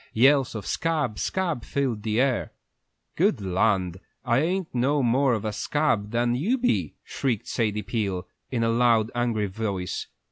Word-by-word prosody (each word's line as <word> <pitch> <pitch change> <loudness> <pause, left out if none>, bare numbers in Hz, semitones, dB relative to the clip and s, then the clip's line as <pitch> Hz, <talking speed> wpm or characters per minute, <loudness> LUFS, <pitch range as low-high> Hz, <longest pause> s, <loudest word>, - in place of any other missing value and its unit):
Yells 135 +1 +4
of 105 -3 -5
"Scab, 150 -10 -1
scab!" 170 -10 -1
filled 130 -6 -1
the 110 +1 0
air. 130 -2 +1 0.6
"Good 175 - +2
land, 95 -1 +1 0.3
I 120 - +3
ain't 180 +3 -1
no 135 +3 +2
more 125 +2 +3
of 110 0 -4
a 105 - -2
scab 115 -3 0
than 120 +1 +1
you 190 - +1
be!" 100 - 0
shrieked 125 -7 -2
Sadie 105 -2 -1
Peel, 95 -3 -2 0.2
in 120 -3 -1
a 115 - +2
loud, 115 -1 +3
angry 120 -3 0
voice. 100 -2 -3
115 Hz, 155 wpm, -25 LUFS, 105-140 Hz, 0.6 s, Yells